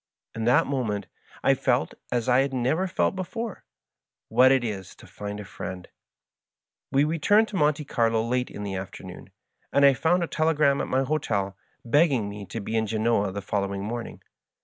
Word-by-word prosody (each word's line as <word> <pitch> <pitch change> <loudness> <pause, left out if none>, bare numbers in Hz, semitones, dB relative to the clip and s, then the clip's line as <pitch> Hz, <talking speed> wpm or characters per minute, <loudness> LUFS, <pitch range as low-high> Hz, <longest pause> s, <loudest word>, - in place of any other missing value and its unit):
In 115 -1 -3
that 120 - +4
moment 115 -7 -2 0.4
I - - +5
felt, - - 0 0.2
as 120 -1 0
I 125 0 +5
had 135 0 +1
never 135 +10 +1
felt 185 +1 0
before, 215 +3 -5 0.6
what 130 +1 +6
it 135 -2 +3
is 100 -5 -5
to - - -16
find 105 0 -7
a 105 - -7
friend. 95 -2 -7 1.0
We 135 +1 +4
retomed 185 +8 +3
to 210 - -7
Monte 150 -3 +1
Carlo 115 -3 +1
late 125 +2 -1
in 105 - -7
the 100 -1 -4
afternoon, 95 0 -8 0.4
and 140 - +5
I - - +9
f 135 - -1
onnd 175 +2 +3
a - - -2
telegram 155 -4 +2
at - - -3
my 130 +1 +1
hotel 105 -10 -1 0.3
begging 130 -4 +3
me 100 -1 -8
to 115 - -5
be 110 +2 -4
in 110 -1 +1
Genoa 110 -2 +1
the 100 +1 -5
following 100 0 -2
morning. 115 +3 -6
120 Hz, 185 wpm, -26 LUFS, 105-150 Hz, 1.0 s, I